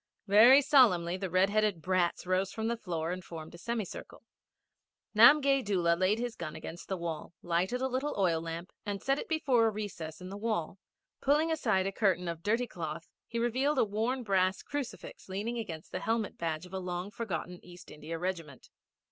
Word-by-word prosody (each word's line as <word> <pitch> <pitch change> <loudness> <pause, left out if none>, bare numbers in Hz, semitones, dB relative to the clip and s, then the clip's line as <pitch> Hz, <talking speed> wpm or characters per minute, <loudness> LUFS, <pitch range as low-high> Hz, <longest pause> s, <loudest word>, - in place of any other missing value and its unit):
Very 230 +8 +7
solemnly, 185 - +4
the 190 0 -4
red 185 +3 +3
headed 215 -4 +2
brats 180 +1 0
rose 185 +1 0
from 220 0 -3
the 235 - 0
floor 170 -6 -3
and 185 0 -5
formed 160 -2 -9
a 170 - -11
semicircle. 225 -1 -5 0.9
Namgay 275 +4 +7
Doola 175 -5 +2
laid 185 +4 +2
his 240 0 -3
gun 155 - -6
against 170 - -8
the 190 - -2
wall, 170 -1 -5
lighted 180 +9 0
a 265 - +1
little 265 +3 -2
oil 170 -5 +2
lamp, 165 +2 -6
and 205 -2 -3
set 275 +5 0
it - - -7
before 265 -8 +3
a - - +3
recess 195 -7 -6
in 180 0 -8
the 200 - -6
wall. 205 -5 -2 0.4
Pulling 300 +4 +3
aside 220 -12 +1
a 195 - -1
curtain 190 -4 +1
of 170 -1 -4
dirty 230 +6 +1
cloth 165 -5 -6 0.2
he 235 - -5
revealed 260 +5 +1
a 255 - +4
worn 225 +5 -1
brass 190 -3 +1
crucifix 285 -8 -6
leaning 215 +5 -3
against 165 -8 -7
the 185 - -3
helmet 225 +1 -1
badge 165 0 -3
of 180 - -14
a 190 - -2
long 180 +1 -4
forgotten 185 -5 -5
East 175 0 -13
India 155 +2 -6
regiment. 165 -6 -5
195 Hz, 190 wpm, -31 LUFS, 175-235 Hz, 0.9 s, Very